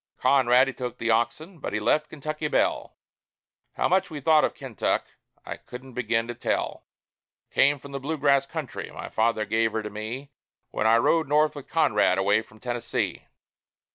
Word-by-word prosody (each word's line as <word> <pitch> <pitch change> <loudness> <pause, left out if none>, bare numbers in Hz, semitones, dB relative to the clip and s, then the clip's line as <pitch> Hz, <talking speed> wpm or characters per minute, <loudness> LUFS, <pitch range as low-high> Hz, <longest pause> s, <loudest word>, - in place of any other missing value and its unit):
Conrad, 130 -1 +4
he 135 - -3
took 125 -1 -5
the 115 0 0
oxen, 120 +10 -1
but - - -5
he 105 - 0
left 150 +8 +1
Kentucky 155 +1 -4
Belle. - - 0 0.8
How - - +1
much 185 +1 +2
we 155 - -6
thought 155 +2 +4
of - - 0
Kentuck, 130 -5 -1 0.4
I - - -6
couldn't 125 +1 -11
begin 115 -1 0
to 120 - -4
tell 120 - -2 0.6
Came 145 +1 +4
from 140 +1 -12
the 140 - -4
Blue 155 +4 -3
Grass 140 -1 +3
country; 155 -5 -5
my - - -8
father 110 -1 +1
gave 110 +1 +1
her 110 - -2
to 105 - -6
me 115 +7 -6 0.4
When 110 - 0
I 115 +1 +6
rode 160 +6 +2
North 150 +2 +3
with 145 - -9
Conrad, 105 - +3
away 100 +3 +3
from 110 -1 -18
Tennessee. 120 0 -3
125 Hz, 180 wpm, -26 LUFS, 115-145 Hz, 0.8 s, I